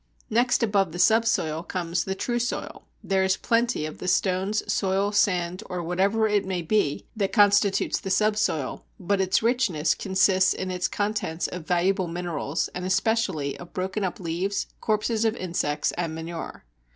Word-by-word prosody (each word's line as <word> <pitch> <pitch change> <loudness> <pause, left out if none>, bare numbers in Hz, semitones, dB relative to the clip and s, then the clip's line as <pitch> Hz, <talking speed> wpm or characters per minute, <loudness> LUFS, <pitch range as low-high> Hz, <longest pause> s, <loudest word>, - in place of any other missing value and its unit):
Next 240 +2 +2
above 200 -6 +1
the - - -5
subsoil 220 -7 +2
comes 170 -1 -2
the 190 - -2
true 240 +4 -1
soil; 240 +1 -4 0.2
there 190 -1 +1
is 190 0 +2
plenty 235 -7 +1
of 155 - -7
the - - -5
stones, 190 +3 +1
soil, 195 +1 +1
sand, 180 -2 +1
or 180 -2 -3
whatever 195 +6 +1
it 210 -2 +2
may 185 -2 -3
be 165 -5 0
that 200 -3 -1
constitutes 205 -2 +3
the 190 - -6
subsoil, 210 -8 0 0.2
but 195 +1 0
its 190 +3 +1
richness 205 -11 +2
consists 190 +1 +2
in 185 0 -3
its 180 0 -1
contents 205 -5 -2
of 180 -3 -6
valuable 180 +1 +1
minerals, 165 -3 -2
and 180 - -6
especially 185 -7 0
of 175 - -11
broken 190 +3 -2
up 185 - -3
leaves, 185 +3 -2
corpses 215 +1 0
of 225 0 +1
insects, 160 -4 -1
and 165 -2 -3
manure. 165 - -7
190 Hz, 165 wpm, -25 LUFS, 175-210 Hz, 0.2 s, constitutes